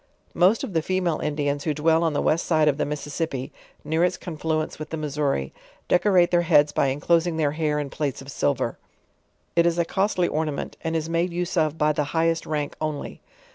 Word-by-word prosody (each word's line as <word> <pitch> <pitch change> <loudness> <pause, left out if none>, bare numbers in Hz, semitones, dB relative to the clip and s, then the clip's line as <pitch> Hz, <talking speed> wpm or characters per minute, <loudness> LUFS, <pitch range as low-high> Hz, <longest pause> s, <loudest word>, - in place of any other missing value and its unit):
Most 185 +6 +3
of 195 - -5
the 165 - +2
female 180 -2 0
Indians 145 -1 -1
who 155 -2 0
dwell 160 +2 +3
on 165 -2 +1
the - - 0
west 160 +2 +1
side 155 -2 +3
of 145 -2 +2
the - - -1
Mississippi, 145 -2 -4 0.3
near 160 +3 +1
its 180 0 +1
confluence 155 -2 -3
with 155 0 -6
the 160 - -4
Missouri, 145 - -1 0.3
deco 190 +3 +3
rate 180 -2 +4
their 175 -1 +4
heads 150 -3 +4
by 140 - +1
enclosing 165 +5 +1
their 150 -3 +1
hair 150 -1 -1
in 145 -2 -3
plates 145 -4 -2
of 135 +1 -9
silver; 130 -5 -1 0.8
it 170 0 +4
is 170 0 +1
a 170 - +2
costly 190 -1 +1
ornament 155 -2 -2
and 165 0 -1
is 160 -1 -1
made 170 +2 0
use 175 +2 -3
of 155 -2 +1
by 150 -1 +3
the 150 0 0
highest 165 0 +1
rank 150 -2 -2
only. 155 -2 -4
155 Hz, 210 wpm, -24 LUFS, 150-170 Hz, 0.8 s, rate